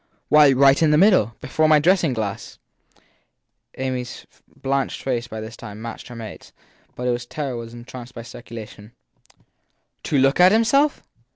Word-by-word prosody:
Why, 150 Hz, -2 st, +7 dB
right 135 Hz, +2 st, +4 dB
in 160 Hz, -, +4 dB
the 150 Hz, -, +4 dB
middle 165 Hz, -, +4 dB
before 155 Hz, +4 st, +1 dB
my 155 Hz, -, +6 dB
dressing 170 Hz, -1 st, +2 dB
glass. 105 Hz, -4 st, -5 dB, 1.2 s
Amy 130 Hz, -1 st, -2 dB
s 125 Hz, -, -10 dB, 0.3 s
blanched 135 Hz, 0 st, -2 dB
face 120 Hz, -3 st, -2 dB
by 110 Hz, -2 st, -7 dB
this 110 Hz, +2 st, -8 dB
time 105 Hz, 0 st, -10 dB
matched 115 Hz, 0 st, -8 dB
her 120 Hz, -, -10 dB
mate 115 Hz, -2 st, -8 dB
s, -, -, -19 dB, 0.4 s
but 125 Hz, -, -4 dB
its 120 Hz, 0 st, -2 dB
terror 140 Hz, -3 st, -4 dB
was 115 Hz, 0 st, -8 dB
enhanced 120 Hz, +1 st, -10 dB
by 115 Hz, -, -7 dB
speculation. 115 Hz, -2 st, -11 dB, 1.1 s
To 145 Hz, -, 0 dB
look 135 Hz, +3 st, +3 dB
at 180 Hz, +1 st, +7 dB
himself? 275 Hz, +7 st, +2 dB
125 Hz, 165 wpm, -22 LUFS, 115-150 Hz, 1.2 s, Why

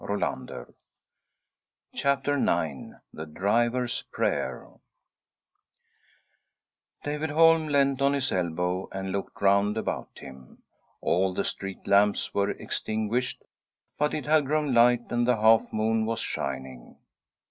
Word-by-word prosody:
•• -, -, -3 dB
1 -, -, -3 dB, 2.6 s
THE 80 Hz, -, -7 dB
DRIVER 115 Hz, +9 st, +1 dB
S 120 Hz, -, -2 dB
PRAYER -, -, -2 dB, 2.3 s
David 150 Hz, +2 st, -3 dB
Holm 165 Hz, +1 st, +4 dB
leant 140 Hz, -2 st, +2 dB
on 140 Hz, +1 st, +3 dB
his 135 Hz, -2 st, 0 dB
elbow 90 Hz, +1 st, -1 dB
and 95 Hz, 0 st, -4 dB
looked 100 Hz, +1 st, -5 dB
round 100 Hz, +2 st, +3 dB
about 110 Hz, -, -4 dB
him. 65 Hz, -2 st, -13 dB, 0.4 s
All 95 Hz, +1 st, +1 dB
the -, -, 0 dB
street 95 Hz, -1 st, -5 dB
lamps 100 Hz, +1 st, +2 dB
were 100 Hz, 0 st, +1 dB
extinguished, 110 Hz, +3 st, -3 dB, 0.6 s
but 150 Hz, 0 st, +1 dB
it 150 Hz, -, -4 dB
had 150 Hz, -2 st, +3 dB
grown 150 Hz, -2 st, 0 dB
light, 120 Hz, 0 st, +5 dB
and 120 Hz, 0 st, +1 dB
the 125 Hz, -2 st, +3 dB
half 110 Hz, +1 st, +4 dB
moon 110 Hz, 0 st, 0 dB
was 115 Hz, 0 st, -2 dB
shining. 65 Hz, -2 st, -5 dB
110 Hz, 115 wpm, -27 LUFS, 95-135 Hz, 2.6 s, light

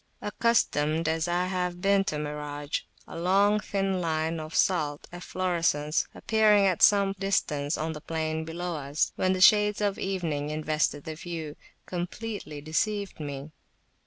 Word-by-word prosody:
Accustomed 165 Hz, -8 st, +1 dB
as 160 Hz, +1 st, 0 dB
I 175 Hz, +1 st, +1 dB
have 180 Hz, -1 st, -2 dB
been 195 Hz, +1 st, +3 dB
to 150 Hz, -, -2 dB
mirage, 150 Hz, -1 st, -3 dB, 0.3 s
a -, -, -7 dB
long 200 Hz, +4 st, +3 dB
thin 195 Hz, -2 st, -1 dB
line 160 Hz, 0 st, -1 dB
of 155 Hz, 0 st, -7 dB
salt 150 Hz, -6 st, +1 dB
efflorescence 170 Hz, -4 st, 0 dB
appearing 215 Hz, -2 st, +4 dB
at 185 Hz, -3 st, +1 dB
some 200 Hz, -2 st, +5 dB
distance 150 Hz, -7 st, 0 dB
on 160 Hz, +1 st, -2 dB
the 150 Hz, -, -8 dB
plain 160 Hz, 0 st, -2 dB
below 170 Hz, +1 st, -4 dB
us, 145 Hz, +1 st, -1 dB
when 185 Hz, 0 st, +1 dB
the 185 Hz, -, -2 dB
shades 210 Hz, +2 st, +6 dB
of 205 Hz, -2 st, 0 dB
evening 165 Hz, -7 st, -2 dB
invested 155 Hz, -1 st, -1 dB
the 160 Hz, -, -5 dB
view, 160 Hz, -2 st, -6 dB, 0.3 s
completely 180 Hz, -3 st, -5 dB
deceived 200 Hz, +6 st, -2 dB
me. 145 Hz, 0 st, -6 dB
165 Hz, 145 wpm, -28 LUFS, 155-195 Hz, 0.3 s, shades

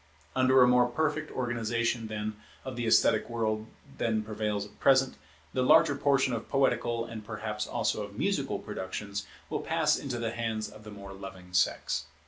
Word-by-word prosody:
Under 130 Hz, 0 st, +6 dB
a -, -, +6 dB
more 125 Hz, 0 st, +5 dB
perfect 155 Hz, +4 st, -1 dB
organization, 120 Hz, -1 st, -1 dB
then, 105 Hz, 0 st, -3 dB, 0.3 s
of 130 Hz, -1 st, -5 dB
the 120 Hz, -1 st, -2 dB
esthetic 110 Hz, 0 st, +4 dB
world 110 Hz, -2 st, -1 dB, 0.3 s
than 110 Hz, -2 st, +1 dB
prevails 105 Hz, -1 st, -2 dB
at 105 Hz, -, -17 dB
present, 135 Hz, -1 st, +4 dB, 0.4 s
the 130 Hz, -, +1 dB
larger 145 Hz, +4 st, +6 dB
portion 135 Hz, -2 st, +2 dB
of 115 Hz, -, -4 dB
poetical 120 Hz, -4 st, +1 dB
and 115 Hz, -2 st, -7 dB
perhaps 105 Hz, 0 st, -4 dB
also -, -, 0 dB
of -, -, -7 dB
musical -, -, 0 dB
productions, 100 Hz, +2 st, -5 dB, 0.2 s
will -, -, -2 dB
pass -, -, +2 dB
into 130 Hz, -4 st, -4 dB
the 115 Hz, -1 st, -2 dB
hands 110 Hz, -2 st, -2 dB
of 110 Hz, 0 st, -13 dB
the -, -, -8 dB
more 100 Hz, -1 st, -9 dB
loving 95 Hz, -2 st, -10 dB
sex. 80 Hz, -4 st, +1 dB
115 Hz, 170 wpm, -29 LUFS, 105-125 Hz, 0.4 s, Under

